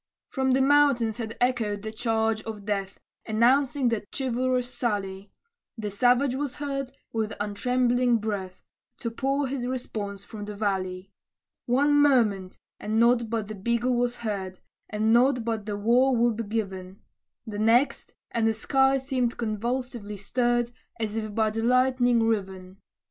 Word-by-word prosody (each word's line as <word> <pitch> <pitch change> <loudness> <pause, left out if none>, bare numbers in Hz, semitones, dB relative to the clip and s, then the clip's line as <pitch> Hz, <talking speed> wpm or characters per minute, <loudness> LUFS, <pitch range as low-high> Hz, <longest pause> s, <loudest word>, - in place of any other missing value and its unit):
From 265 -1 +1
the 265 +1 +3
mountains 275 -6 +3
had 225 -1 -5
echoed 225 -5 0
the 220 - -4
charge 220 -1 0
of 215 -3 -7
death, 200 -2 -3 0.3
Announcing 250 +4 +3
that 215 -3 -2
chivalrous 255 -1 0
sally; 200 -4 -3 0.5
The 210 -2 -4
savage 245 +5 +3
was 275 -1 -3
heard, 275 -2 -4 0.2
with 220 -1 -1
untrembling 245 +3 +1
breath, 200 -4 -4 0.4
To 230 - -2
pour 275 +4 0
his 255 -2 -3
response 210 -6 -4
from 210 -1 -8
the 210 0 -7
valley. 190 -2 -2 0.6
One 280 +4 +3
moment, 215 -10 +2 0.2
and 220 +1 -1
nought 235 -1 +3
but 225 -2 -2
the 215 - -6
bugle 235 +5 0
was 245 0 0
heard, 190 -3 -3 0.3
And 215 +1 +1
nought 245 0 +3
but 220 -3 -2
the 205 -1 -2
war 245 +5 +3
whoop 230 -2 +1
given; 195 -3 -4 0.4
The 210 -3 -5
next, 230 +6 +2 0.2
and 230 -1 +1
the 225 - +1
sky 270 +4 +2
seemed 255 -3 -1
convulsively 230 -1 -3
stirred, 240 +3 0 0.3
As 215 -1 -2
if 215 -2 -4
by 220 -1 +2
the 225 +1 -3
lightning 250 -1 +3
riven. 190 -4 -2
230 Hz, 150 wpm, -26 LUFS, 210-250 Hz, 0.6 s, the